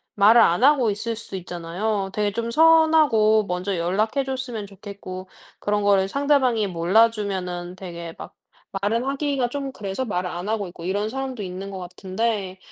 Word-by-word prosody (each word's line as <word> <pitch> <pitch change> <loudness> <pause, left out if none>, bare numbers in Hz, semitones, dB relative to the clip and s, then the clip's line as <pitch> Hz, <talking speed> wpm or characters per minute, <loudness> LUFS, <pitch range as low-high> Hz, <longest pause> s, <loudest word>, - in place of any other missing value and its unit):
말을 215 +4 +6
안 175 +7 +4
하고 265 -6 +5
있을 225 +3 -3
수 220 -3 -7
있잖아요. 185 +3 -3
되게 210 -1 0
좀 230 +2 -3
'서운하고, 310 -8 +5
먼저 180 +2 -2
연락해 210 +10 0
줬으면 255 -5 -4
좋겠고.' 195 -2 -9 0.3
그런 205 0 0
거를 195 -1 +3
상대방이 265 -5 +2
몰라 185 +6 +4
주면은 185 -5 -4
되게 170 -3 -7
막 - - -9 0.5
말을 230 +5 +1
하기가 275 -2 0
좀 275 +1 -4
그래서 200 +3 -4
말을 180 -5 -2
안 175 +2 -5
하고 215 -2 -1
있고 175 -1 -11
이런 205 +3 -1
사람도 265 -3 -4
있는 190 +2 -6
것 190 - -6
같은데 190 +2 -3
205 Hz, 345 characters per minute, -23 LUFS, 185-235 Hz, 0.5 s, 말을